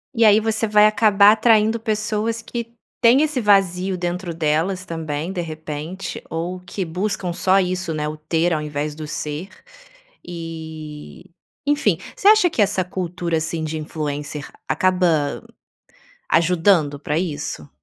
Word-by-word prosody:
E 230 - +3
aí 215 -1 +7
você 220 0 0
vai 210 0 +5
acabar 210 -1 +5
atraindo 220 0 +3
pessoas 220 0 -2
que 235 0 -6 0.3
têm 245 +3 +6
esse 305 -4 0
vazio 195 -3 +2
dentro 175 0 -3
delas 165 +4 0
também, 160 0 -4
de 180 - -2
repente. 160 +2 -6
Ou 175 +3 -4
que 185 +1 -5
buscam 180 +1 -2
só 185 +2 +3
isso, 185 -2 -1
né, 150 -1 -2
o 155 - -4
ter 165 +3 0
ao 155 - -1
invés 150 0 -3
do 155 0 -7
ser 150 +4 -5 0.8
e 160 0 -8 0.4
enfim, 285 - +2 0.2
você 395 - 0
acha 425 -4 +7
que 315 - -7
essa 200 -2 +2
cultura 175 -2 -3
assim 160 +1 -2
de 155 0 -3
influencer 150 -1 -5 0.2
acaba 175 -6 +1 0.9
ajudando 165 -3 +3
pra 150 +1 -2
isso? 145 - -4
180 Hz, 140 wpm, -21 LUFS, 155-210 Hz, 0.9 s, aí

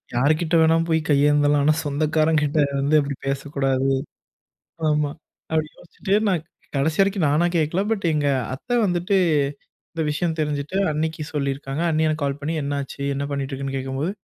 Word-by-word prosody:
யாருகிட்ட 155 +6 +2
வேணாலும் 165 +1 +4
போய் 160 0 +3
கையேந்தலாம். 145 0 +4
ஆனா, 155 +1 +4
சொந்தக்காரங்க 155 +2 +1
கிட்ட 150 +1 -1 0.2
வந்து 145 +3 +2
அப்படி 140 -1 -2
பேசக்கூடாது. 135 -1 0 1.0
ஆமா, 150 -1 +1 0.4
அப்படி 155 -1 0
யோசிச்சுட்டு 190 +3 -3
நான் 175 -5 +1 0.3
கடைசி 155 +5 0
வரைக்கும், 195 -3 +2
நானா 155 +4 +3
கேட்கல 165 +4 +1
பட் 200 -5 -1
எங்க 150 -1 0 0.3
அத்த 245 - -14
வந்துட்டு 180 +1 +1 0.8
இந்த 165 -1 -2
விஷயம் 160 +2 -1
தெரிஞ்சுட்டு 150 +3 -2
அண்ணிக்கு 155 +1 -2
சொல்லியிருக்காங்க. 140 +1 -2
அண்ணி 155 0 +1
எனக்கு 155 -1 -2
கால் 140 0 -1
பண்ணி 155 +3 -2
"என்னாச்சு, 140 -1 -4
என்ன 140 +1 -2
பண்ணிட்டு 140 -1 -3
இருக்குன்னு." 135 0 -3
கேட்கும்போது 135 +6 -2
150 Hz, 150 wpm, -23 LUFS, 140-160 Hz, 1.0 s, வேணாலும்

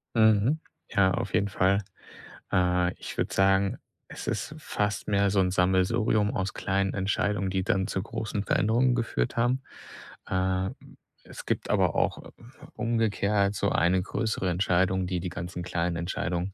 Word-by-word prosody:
Mhm. 110 +6 +4 0.3
Ja, 95 -1 +3
auf - - -3
jeden 100 +2 +2
Fall, 95 +1 +2 0.7
äh, 90 -1 +2
ich - - -7
würde - - -1
sagen, 95 0 +3 0.3
es - - -9
ist - - -3
fast 105 0 -2
mehr 100 -1 +3
so 100 - +2
'n 90 -1 +1
Sammelsurium 95 +4 +2
aus 95 0 -2
kleinen 95 0 -1
Entscheidungen, 100 0 0
die 95 0 -1
dann 95 -2 0
zu 95 - -2
großen 110 -2 -3
Veränderungen 120 +4 +2
geführt 115 - -1
haben. 125 +3 +1 0.6
Äh, 95 0 0 0.6
es - - -10
gibt - - -2
aber - - +2
auch - - -1 0.4
umgekehrt 105 -3 +1
so - - +1
eine 90 +2 +3
größere 100 0 -2
Entscheidung, 90 +1 +1
die, 90 -1 -1
die 90 - -3
ganzen 90 +1 -6
kleinen 85 -1 -1
Entscheidungen, 90 +2 -2
95 Hz, 150 wpm, -27 LUFS, 90-105 Hz, 0.7 s, Mhm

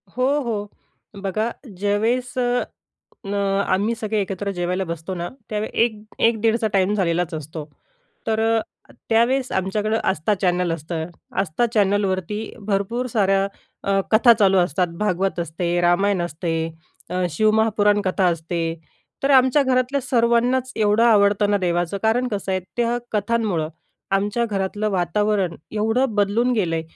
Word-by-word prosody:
हो, 255 +1 +1 0.2
हो. 210 -4 -3 0.5
बघा, 215 +4 -1 0.3
ज्यावेळेस 220 +6 0 0.9
न 195 - -3 0.3
आम्ही 205 +5 +1
सगळे 220 -1 -2
एकत्र 195 +1 -3
जेवायला 180 +1 -1
बसतो 170 +2 -5
ना, 175 0 -4 0.2
त्यावेळेस 215 0 -3
1 230 -2 +2 0.3
1 230 -1 0
दीडचा 225 0 +2
टाईम 195 +1 +2
झालेलाच 175 -3 0
असतो. 155 0 -6 0.6
तर 220 -1 +1
अ, 225 0 -2 0.2
त्यावेळेस 245 +3 +2
आमच्याकडं 210 +4 0
आस्था 190 +4 +1
चॅनल 180 -2 +1
असतं. 160 0 -4 0.4
आस्था 195 +6 0
चॅनलवरती 200 -1 +1 0.3
भरपूर 215 +5 -1
साऱ्या 195 -4 +2 0.4
अ, 195 0 +2
कथा 235 +2 +7
चालू 195 -3 +4
असतात. 180 0 +2
भागवत 195 -2 0
असते, 170 +1 -1
रामायण 185 +2 +2
असते, 170 +1 -3 0.6
अ, 180 0 0
शिवमहापुराण 215 +2 +3
कथा 185 0 +1
असते. 165 0 -2 0.6
तर 275 - +2
आमच्या 260 +2 +5
घरातल्या 260 +1 +1
सर्वांनाच 245 +1 +1
एवढं 215 0 +3
आवडतं 205 -2 +4
ना 205 - +3
देवाचं 175 0 0
कारण 230 +3 +2
कसं 200 -3 -3
आहे 185 - 0 0.2
त्या 240 0 +1 0.2
कथांमुळं 205 -6 0 0.5
आमच्या 205 +4 0
घरातलं 205 0 -2
वातावरण 190 0 0 0.2
एवढं 225 +3 0
बदलून 210 +5 +2
गेलंय, 170 -8 0
205 Hz, 135 wpm, -22 LUFS, 180-225 Hz, 0.9 s, कथा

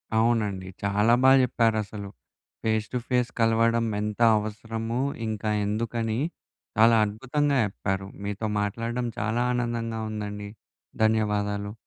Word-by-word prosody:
అవునండి. 110 -5 +1 0.2
చాలా 105 +3 +3
బాగా 135 +1 +7
చెప్పారసలు. 110 -4 0 0.5
ఫేస్ 110 -1 +1
టు - - +1
ఫేస్ 125 -1 +1
కలవడం 115 0 +3 0.2
ఎంత 105 0 -3 0.2
అవసరము. 115 +2 -3 0.3
ఇంకా 110 0 -2 0.2
ఎందుకని, 115 +1 -1 0.6
చాలా 115 +1 +6
అద్భుతంగా 135 +7 0
చెప్పారు. 95 -1 -3 0.2
మీతో 105 +2 -3
మాట్లాడడం 115 +4 -2
చాలా 110 +4 0
ఆనందంగా 115 -2 -2
ఉందండి. 105 -1 -5 0.5
ధన్యవాదాలు. 105 -2 +1
110 Hz, 105 wpm, -26 LUFS, 105-115 Hz, 0.6 s, బాగా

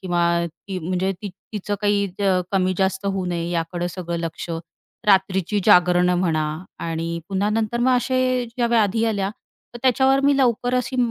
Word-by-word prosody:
किंवा 175 -2 0 0.2
ती 185 +3 -7
म्हणजे 185 +3 -1
ती 205 - -3 0.2
तिचं 205 0 -3
काही 205 -1 +2 0.2
अ, 190 -2 +3
कमी-जास्त 190 +1 0
होऊ 195 -1 -1
नये 170 -1 -2
याकडं 175 +1 -2
सगळं 175 -2 -4
लक्ष, 165 +1 -5 0.6
रात्रीची 190 0 +2
जागरणं 180 -2 +5
म्हणा 160 -4 +1 0.4
आणि 165 0 -3
पुन्हा 200 +2 0
नंतर 225 +2 -1
मग 255 0 +4
असे 255 0 +1
ज्या 240 - +2
व्याधी 225 -1 +2
आल्या, 200 -3 0 0.4
तर - - -6
त्याच्यावर 265 +1 +4
मी 280 -1 +4
लवकर 245 -1 +1
अशी 250 +1 -1
195 Hz, 155 wpm, -22 LUFS, 180-230 Hz, 0.6 s, जागरणं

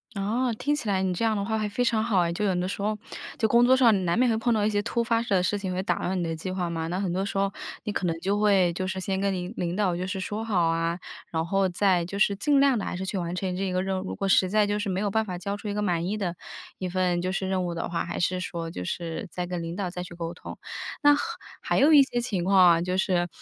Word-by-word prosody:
哦， 230 +5 0
听 290 +5 0
起 295 -7 -3
来 190 -1 +1
你 185 -1 0
这 205 +6 -1
样 220 -1 +2
的 200 - -1
话 220 +2 -1
会 215 - -1
非 210 +4 -1
常 230 -2 +2
好 220 -5 +2
哎， 170 -1 +1
就 210 +5 -1
有 190 -2 +1
的 180 0 0
时 200 - -4
候 210 +1 0 0.4
就 - - +1
工 235 +2 +5
作 260 +1 +6
上 225 -8 +4
难 170 +3 +1
免 250 +1 +4
会 220 - +1
碰 235 +1 +1
到 210 -2 +1
一 - - +3
些 205 -1 +1
突 235 +2 -1
发 230 -1 +1
的 195 -5 +1
事 205 +2 0
情 190 -2 -3
会 185 +1 -2
打 175 -3 0
乱 185 +1 -1
你 180 - -1
的 165 -1 -2
计 160 +4 -5
划 185 -2 -2
嘛， 165 -1 -3
那 175 - -2
很 195 -3 -1
多 190 +2 -1
时 200 - -4
候 195 0 +1 0.3
你 210 - -3
可 200 - -2
能 165 -1 -1
就 200 +3 0
会 195 -4 +4
就 185 +2 -3
是 190 0 -3
先 190 0 -1
跟 200 0 +1
您 180 +2 -4
领 175 0 -2
导 190 -4 +1
就 180 +1 -3
是 190 0 -3
说 210 +4 -3
好 180 -7 +2
啊， 165 +1 0 0.3
然 160 -1 -1
后 195 +2 +2
再 180 -1 +2
就 200 +3 -6
是 200 0 +3
尽 290 +4 +3
量 275 -4 +4
地 - - -3
还 - - -3
是 190 +1 -4
去 190 +1 -3
完 175 -1 -3
成 180 0 -2
这 190 0 -1
个 185 0 0
任 190 0 -1
务， - - -5
如 - - -4
果 195 - -2
实 185 -1 +4
在 210 +1 +3
就 205 0 -1
是 205 - -2
没 190 +1 -1
有 205 -1 0
办 220 +2 +1
法 180 -3 -5
交 200 +3 -4
出 210 - -8
一 205 - -2
个 210 - -1
满 175 -4 0
意 210 +3 -1
的 180 -4 -2 0.4
一 185 - -3
份 180 -1 0
就 185 +1 -1
是 190 0 -2
任 185 -1 0
务 175 - -3
的 165 - -3
话， 170 -1 -2
还 - - -5
是 180 +1 0
说 170 -2 -4
就 90 - -6
是 170 - -4
再 180 +2 -4
跟 175 -1 -4
领 165 +1 -5
导 190 -2 -2
再 180 0 -5
去 175 -1 -10
沟 170 0 -4
通。 - - -9 0.5
那 290 0 +8
还 290 - -2 0.5
还 - - +4
有 310 +3 +6
一 290 - +9
些 265 -3 0
情 200 -7 -2
况 195 +1 +3
啊， 175 -2 +6
就 180 +1 -1
是 180 -2 +1
190 Hz, 335 characters per minute, -26 LUFS, 180-210 Hz, 0.5 s, 一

